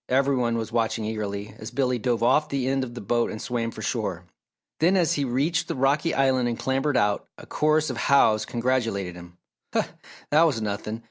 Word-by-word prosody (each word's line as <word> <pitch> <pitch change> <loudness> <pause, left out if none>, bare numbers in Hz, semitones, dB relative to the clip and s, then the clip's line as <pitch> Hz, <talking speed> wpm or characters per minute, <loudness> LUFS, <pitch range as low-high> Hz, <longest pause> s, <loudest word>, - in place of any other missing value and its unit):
Every 135 +2 +3
one 120 -2 0
was 110 0 -4
watching 115 -1 0
eagerly 105 -1 -4
as 110 - -6
Billy 125 -3 0
dove 120 0 0
off 150 +5 +3
the 135 -2 -1
end 135 0 +1
of 120 -1 -7
the - - -6
boat 120 +4 +1
and 110 - -6
swam 115 -2 -2
for - - -9
shore. - - -2 0.5
Then, 180 +5 +4
as 175 -3 +2
he 145 - 0
reached 155 +7 0
the 165 - -3
rocky 140 +5 +2
island 130 -3 +2
and 115 - -3
clambered 135 +1 0
out, 105 -1 +1
a - - -12
chorus 155 +1 +1
of - - -6
"Hows" 110 -6 +4
congratulated 115 -7 -1
him. 85 0 -12 0.4
"Huh! - - +3 0.5
That 155 +3 +6
was 140 -8 +1
nothing! 105 +1 -3
125 Hz, 205 wpm, -25 LUFS, 110-140 Hz, 0.5 s, That